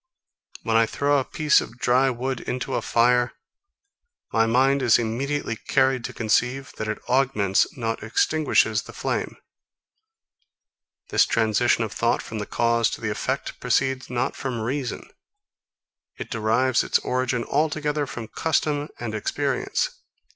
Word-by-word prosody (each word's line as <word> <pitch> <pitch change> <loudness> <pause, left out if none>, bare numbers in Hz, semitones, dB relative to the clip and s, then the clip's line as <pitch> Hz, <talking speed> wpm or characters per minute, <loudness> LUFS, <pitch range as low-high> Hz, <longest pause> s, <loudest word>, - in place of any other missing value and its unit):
When 115 -1 0
I 115 0 +5
throw 145 +3 +1
a - - -1
piece 150 +2 +3
of 120 - -9
dry 130 0 +3
wood 130 +1 -3
into 125 0 -4
a - - 0
fire, 120 +1 +2 1.0
my 115 0 +3
mind 135 +4 +3
is 120 -4 +5
immediately 120 +3 -2
carried 130 +2 +1
to - - -4
conceive, 125 +4 0
that 110 - -3
it 110 - -2
augments, 125 -7 +2
not 115 -2 -2
extinguishes 155 +8 +2
the - - -12
flame. - - -3 1.7
This - - +4
transition 115 +1 +2
of 110 - -4
thought 115 - 0
from 110 - -6
the 105 - -4
cause 115 -1 +2
to - - -17
the 110 -2 -1
effect 130 +6 -3
proceeds 130 +2 0
not 120 -1 -1
from 125 -4 -4
reason. 130 +3 -3 1.1
It - - -7
derives 115 +3 +2
its - - +2
origin 125 -1 -1
altogether 150 0 0
from 120 -4 -7
custom 150 +2 -1
and 120 -2 -4
experience. 140 - -1
125 Hz, 140 wpm, -24 LUFS, 115-135 Hz, 1.7 s, I